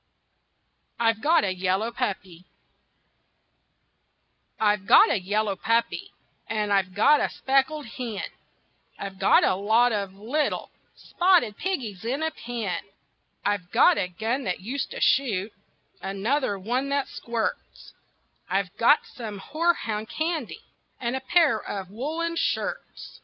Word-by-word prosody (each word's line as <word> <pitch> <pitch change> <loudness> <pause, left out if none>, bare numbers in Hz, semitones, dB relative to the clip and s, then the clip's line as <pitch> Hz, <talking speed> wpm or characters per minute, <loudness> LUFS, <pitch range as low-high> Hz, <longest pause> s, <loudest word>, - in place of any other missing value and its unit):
I'VE 225 -1 +2
GOT 320 -2 +4
A 190 -2 0
YELLOW 190 +5 0
PUPPY 190 -7 -4 2.1
I've 210 -2 +1
got - - +7
a 200 - +1
yellow 205 +2 0
puppy, 230 - 0 0.4
And 210 -2 -1
I've 190 -2 +1
got 290 +8 +5
a - - +1
speckled 275 +3 0
hen, 230 -2 -5 0.7
I've 195 -1 -7
got 190 - +5
a - - +3
lot 220 +6 +3
of 200 -3 -3
little 245 +10 -2 0.2
Spotted 350 - +2
piggies 245 - -3
in 265 +7 -2
a 320 - 0
pen. 230 - -4 0.6
I've 200 -4 -1
got - - +5
a - - 0
gun 225 +9 -2
that 180 -2 -2
used 260 +9 -3
to - - -7
shoot, 215 -6 +2 0.5
Another 205 +4 -1
one 245 +8 -2
that 280 -1 0
squirts, 235 -2 -4 0.6
I've 185 0 -1
got 240 +6 +4
some 220 -4 -8
horehound 230 - -1
candy 315 -5 -3 0.4
And 240 +1 -2
a 265 - -3
pair 280 -3 +3
of 195 -2 -6
woolen 320 +9 -3
shirts. - - -3
225 Hz, 130 wpm, -25 LUFS, 200-275 Hz, 2.1 s, got